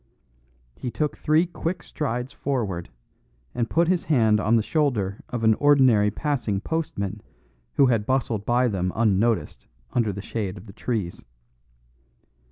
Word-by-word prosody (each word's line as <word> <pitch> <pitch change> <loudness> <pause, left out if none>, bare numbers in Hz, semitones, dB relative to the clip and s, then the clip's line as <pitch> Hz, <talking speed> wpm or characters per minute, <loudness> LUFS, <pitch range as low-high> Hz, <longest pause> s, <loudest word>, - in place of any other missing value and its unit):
He 125 - -5
took 150 +4 -2
three 155 +3 +2
quick 175 -1 -4
strides 125 -3 -3
forward, 110 -13 -3 0.6
and 115 -1 -1
put 170 0 +2
his 180 -1 +1
hand 110 -8 +3
on 110 +2 +2
the 110 - +3
shoulder 110 - 0
of 120 -2 -3
an 110 0 +6
ordinary 130 -6 +4
passing 125 -6 -1
postman 115 - -3 0.5
who 140 - +6
had 115 -5 +1
bustled 120 -5 0
by 120 +3 +2
them 90 -4 -1
unnoticed 110 - +1 0.3
under 115 -4 +1
the 100 - -6
shade 105 -4 -4
of 95 - -11
the 100 - -12
trees. 105 -8 -3
115 Hz, 145 wpm, -24 LUFS, 105-140 Hz, 0.6 s, an